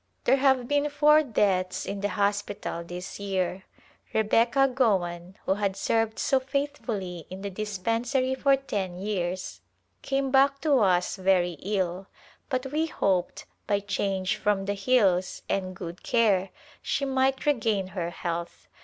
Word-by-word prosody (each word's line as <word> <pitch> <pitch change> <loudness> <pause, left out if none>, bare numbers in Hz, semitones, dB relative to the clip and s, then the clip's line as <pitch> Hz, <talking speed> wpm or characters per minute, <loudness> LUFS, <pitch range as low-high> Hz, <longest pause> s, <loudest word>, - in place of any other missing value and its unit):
There 270 - +4
have 265 -2 +3
been 290 +1 +1
four 300 +1 +5
deaths 190 -8 0
in 200 0 -4
the 205 - 0
hospital 205 -4 -2
this 180 +3 -7
year. 190 -1 -2 0.5
Rebecca 230 +5 +3
Gowan, 190 -8 0
who - - +3
had 200 -1 -1
served 225 -1 0
so 270 -2 +2
faithfully 255 - -3
in 190 +1 -8
the 200 - -4
dispensary 230 +6 -1
for 275 +1 +3
ten 195 -9 -4
years, 185 -2 -3 0.4
came 270 -1 -1
back 275 +1 +4
to 290 -4 +3
us 180 -2 +2
very 185 -2 +2
ill, 190 -2 -2 0.4
but 255 -1 -1
we 315 +2 0
hoped, 185 - -1 0.2
by 205 -2 +2
change 195 -1 -1
from 205 -2 0
the 200 - 0
hills 195 -4 +2
and 185 -1 -2
good 175 -1 -7
care, 200 -5 +2 0.3
she 275 - -1
might 265 0 +1
regain 220 -9 +1
her 175 -2 -3
health. 170 0 -5
205 Hz, 145 wpm, -27 LUFS, 185-260 Hz, 0.5 s, four